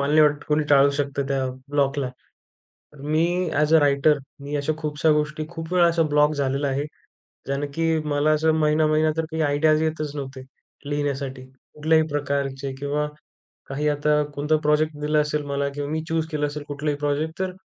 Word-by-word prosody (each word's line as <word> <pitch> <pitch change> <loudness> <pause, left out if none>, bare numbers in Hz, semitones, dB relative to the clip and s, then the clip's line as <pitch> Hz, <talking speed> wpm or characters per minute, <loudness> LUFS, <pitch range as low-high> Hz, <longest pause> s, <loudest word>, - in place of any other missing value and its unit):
मल 140 +1 0
नाही 155 +1 +5
वाटतं 150 -1 +3
कोणी 150 +1 +2
टाळू 140 0 +6
शकतं 140 -1 -2
त्या 135 -1 0 0.2
ब्लॉकला. 140 -1 +1 0.9
तर 145 - -14
मी 155 +3 +1 0.3
अ‍ॅज 150 +1 +1
अ - - +7
राइटर 145 +1 +3 0.2
मी 145 +1 -5
अशा 145 +2 0
खूपशा 155 0 +1
गोष्टी, 150 0 0
खूप 165 0 -6
वेळा, 180 -1 +5
असा 170 0 +1
ब्लॉक 150 +1 +4
झालेला 140 0 -1
आहे. 140 +1 -1 0.6
ज्याने 140 +1 -2
की 165 0 +1 0.2
मला 150 +1 +2
असं 155 +1 +3
महिना-महिना 155 0 +3
तर 160 - 0
काही 160 0 -2
आयडियाज 155 +1 +3
येतच 155 -2 -2
नव्हते, 135 -2 -6 0.5
लिहिण्यासाठी. 140 -2 -2 0.3
कुठल्याही 160 +1 +3
प्रकारचे 140 -2 -2
किंवा 145 +1 -1 0.6
काही 145 +2 -1
आता 150 +1 +2
कोणता 150 +2 +1
प्रॉजेक्ट 150 0 +2
दिला 150 +1 +2
असेल 150 0 0
मला 140 0 -1
किंवा 145 0 -3
मी 160 +1 -1
चूज 160 0 0
केलं 150 -1 0
असेल 145 0 -6
कुठलाही 145 +1 -2
प्रॉजेक्ट 150 +3 -2
तर 190 -1 -1
150 Hz, 175 wpm, -23 LUFS, 140-155 Hz, 0.9 s, अ